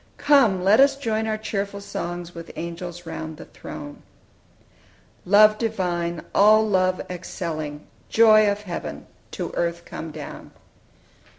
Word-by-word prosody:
"Come, 255 -11 +4
let 200 +5 +5
us 275 0 +6
join 220 -5 -2
our 215 0 -1
cheerful 200 -2 -4
songs 175 -3 -6
With 165 0 -9
angels 175 +1 -6
round 160 -1 -6
the - - -10
throne." 145 -1 -10 1.3
"Love 215 +2 +6
divine, 175 -7 -2
all 215 +2 +5
love 185 -2 +2
excelling; 155 -4 -5 0.2
Joy 215 -2 +6
of 205 +1 -5
heaven, 175 -4 -6 0.3
to - - -4
earth 170 0 -2
come 165 - -7
down." 150 -1 -9
185 Hz, 125 wpm, -23 LUFS, 170-215 Hz, 1.3 s, us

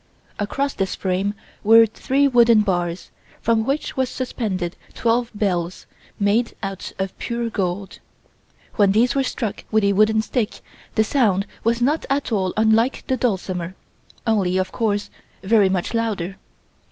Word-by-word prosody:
Across 275 +7 -1
this 190 -1 -2
frame 195 +2 -1 0.3
were 225 +2 +8
three 265 +5 +1
wooden 235 -4 +5
bars, 175 -3 -2 0.3
from 225 -1 +2
which 275 +6 -2
was 260 -1 0
suspended 200 -10 -3 0.2
twelve 235 +1 +1
bells, 180 -4 -1 0.3
made 215 +4 +1
out 195 -1 -5
of 190 0 -3
pure 235 -1 -3
gold. 195 0 -3 0.8
When 200 -2 +4
these 240 +3 +3
were 275 - +2
struck 240 -4 -3
with 220 -1 +2
a 200 0 +3
wooden 215 +2 +3
stick 230 -2 -2 0.3
the 220 - +4
sound 210 -6 +2 0.2
was 230 +1 +1
not 295 +5 +1
at 275 -2 0
all 190 -4 +1
unlike 220 +4 +2
the 260 - 0
dulcimer, 190 -7 -2 0.5
only, 195 -5 +1
of 185 0 -1
course, 210 -3 -1 0.3
very 200 -1 +4
much 185 +2 -1
louder. 205 -5 -2
215 Hz, 145 wpm, -22 LUFS, 190-235 Hz, 0.8 s, were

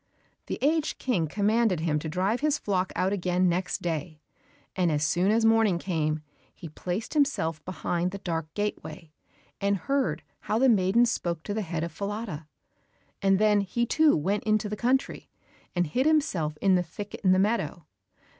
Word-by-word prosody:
The - - -3
aged 310 +2 +1
King 185 -11 0
commanded 210 0 +1
him 155 -2 0
to 155 - -5
drive 190 +8 0
his 300 0 +1
flock 190 -7 -1
out 190 +2 +1
again 180 -1 +1
next 180 +1 -1
day, 160 -2 -3 0.6
and 180 -3 +2
as 150 0 +1
soon 180 +4 +2
as 225 +1 +3
morning 225 -5 +4
came, 155 -4 -1 0.3
he 165 - -9
placed 180 +7 -4
himself 165 - 0
behind 180 -1 -2
the 200 - -6
dark 165 -4 -4
gateway, 165 -6 -4 0.5
and 200 0 +1
heard 275 +9 -1 0.2
how 215 - -1
the 265 +2 +4
maiden 210 +2 +4
spoke 170 -8 -2
to 205 - -4
the 220 - -1
head 165 -4 -3
of 170 - -4
Falada, 200 -6 -5 0.7
and 195 0 +4
then 210 0 +4
he 220 +5 -1
too 310 - +4
went 195 +7 -1
into 215 -1 +1
the 210 - -3
country, 255 +5 -1 0.5
and 175 0 +2
hid 250 - 0
himself 190 - +1
in 195 -1 +4
the 180 - +4
thicket 185 +4 -8
in 185 - +5
the 185 - +5
meadow. 190 -6 0
190 Hz, 175 wpm, -27 LUFS, 170-220 Hz, 0.7 s, in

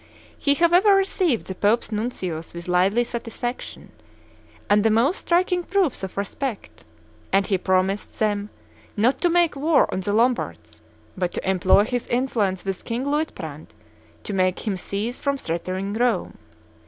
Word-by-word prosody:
He, 285 -1 +1
however, 355 +5 +5
received 375 - +1
the 190 - -5
Pope's 210 +5 +1
nuncios 185 -8 -4
with 170 0 -7
lively 190 +6 +3
satisfaction 240 +1 -5 0.8
and 205 0 +4
the 225 - +4
most 235 - +3
striking 355 +1 +1
proofs 365 -4 0
of 190 0 -6
respect; 215 +3 -4 0.5
and 195 0 +3
he 190 -2 0
promised 190 +2 0
them, 205 -1 0 0.5
not 235 +6 +2
to 350 - +3
make 345 -2 +3
war 295 +2 +3
on - - -1
the 190 +2 -2
Lombards, 85 - 0 0.3
but 180 -2 -2
to - - -4
employ 190 +1 +4
his 245 +2 -3
influence 225 -7 0
with 195 -1 -3
King 240 +3 -3
Luitprandt 300 +2 -4 0.5
to 205 - -5
make 185 +1 0
him 205 -3 0
cease 205 +6 -4
from 280 -1 0
threatening 185 0 -3
Rome. 240 +2 0
220 Hz, 150 wpm, -23 LUFS, 190-275 Hz, 0.8 s, however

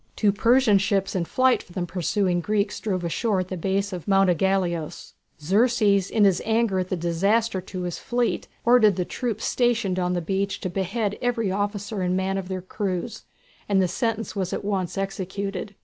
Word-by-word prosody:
Two 210 -2 +3
Persian 230 0 +4
ships 195 -1 0
in 175 -2 0
flight 255 +7 +2
from 175 - -17
the 175 - -1
pursuing 180 +1 0
Greeks 205 +3 -1
drove 185 -4 -2
ashore 185 +4 0
at 185 - -6
the 185 - -3
base 195 +3 -1
of 180 0 -6
Mount 195 -2 +4
Ægaleos. 175 -3 -1 0.3
Xerxes, 200 +2 +2
in 220 - +2
his 195 -3 +3
anger 220 -3 +1
at 185 0 -3
the - - 0
disaster 190 +5 +1
to 185 0 -6
his 175 -2 -4
fleet, 240 0 -1 0.2
ordered 235 -4 +5
the 180 - -1
troops 225 0 -3
stationed 230 -7 +1
on 180 0 0
the 180 - 0
beach 195 +4 -2
to 185 - -3
behead 200 +3 -2
every 235 -5 0
officer 205 +1 -2
and 180 0 0
man 190 +1 -1
of 185 - -6
their 185 -1 -4
crews, 200 +3 -4 0.4
and 200 -1 +3
the 185 - +3
sentence 225 +4 -2
was 190 -2 -2
at - - -4
once 190 -3 -2
executed. 195 +1 -4
195 Hz, 190 wpm, -24 LUFS, 185-215 Hz, 0.4 s, ordered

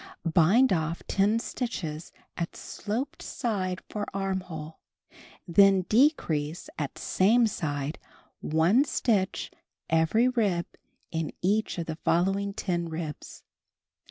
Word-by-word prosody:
Bind 185 +10 +4
off 165 0 -2
10 205 +3 +2
stitches 180 -10 -4 0.2
at 170 -1 -4
sloped 240 +7 -4
side 190 -7 -2
for 210 -1 -4
armhole, 185 -5 -4 0.7
then 195 +2 +5
decrease 180 - +1
at - - -3
same 225 +6 +3
side 150 -7 -3 0.4
one 165 - +3
stitch 205 -9 0 0.4
every 165 +9 +3
rib 205 -9 +1 0.5
in 160 -2 -2
each 210 +3 +1
of 170 - -2
the 160 -1 -5
following 195 +5 +1
10 175 -4 -2
ribs. 160 -2 -6
185 Hz, 105 wpm, -28 LUFS, 165-215 Hz, 0.7 s, then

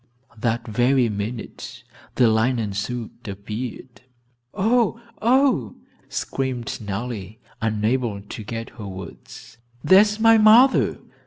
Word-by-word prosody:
That 115 +1 -1
very 120 +2 +2
minute 105 +3 -6 0.3
the 125 - +4
linen 110 -1 +1
suit 115 +3 -5
appeared. 110 +5 -7 0.5
"Oh, 230 +2 +1 0.2
oh!" 235 - +2 0.3
screamed 130 -4 -3
Nellie, 105 0 -5 0.2
unable 110 0 -1
to 105 +1 -8
get 115 +2 -6
her 105 - -6
words. 95 +4 -11 0.2
"There 190 +1 +7
is 210 0 0
my 225 0 +6
mother!" 230 +5 +5
120 Hz, 105 wpm, -22 LUFS, 105-135 Hz, 0.5 s, There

